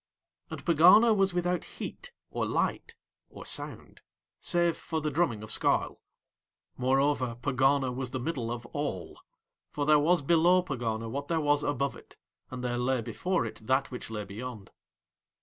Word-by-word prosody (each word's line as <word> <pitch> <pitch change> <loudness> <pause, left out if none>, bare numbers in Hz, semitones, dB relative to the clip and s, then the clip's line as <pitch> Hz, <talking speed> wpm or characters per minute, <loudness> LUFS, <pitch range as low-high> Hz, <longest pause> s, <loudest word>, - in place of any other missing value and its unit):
And - - -8
Pegana 185 +8 +7
was 195 -2 +2
without 180 0 0
heat - - -7 0.2
or - - -1
light - - -1 0.3
or - - -11
sound, - - -6 0.4
save 175 -2 +1
for 160 - -4
the 150 -1 -2
drumming 140 -9 0
of 110 - -4
Skarl; - - +1 0.7
moreover 130 -1 +1
Pegana 130 +2 +1
was 130 0 -3
The 130 - -4
Middle 125 -4 -3
of 120 0 -5
All, 145 -12 -4 0.5
for 145 - -2
there 150 0 +6
was 165 +1 +3
below 170 +4 +4
Pegana 115 -7 -3
what 140 +5 -4
there 165 0 0
was 145 -1 +2
above 140 -1 -1
it, - - -16 0.3
and 125 -1 -6
there 120 -1 -1
lay 125 0 +1
before 180 +5 -1
it 110 - -6
that 135 +1 +1
which 125 - -6
lay 105 -2 -4
beyond. 110 +1 -8
140 Hz, 160 wpm, -29 LUFS, 125-165 Hz, 0.7 s, Pegana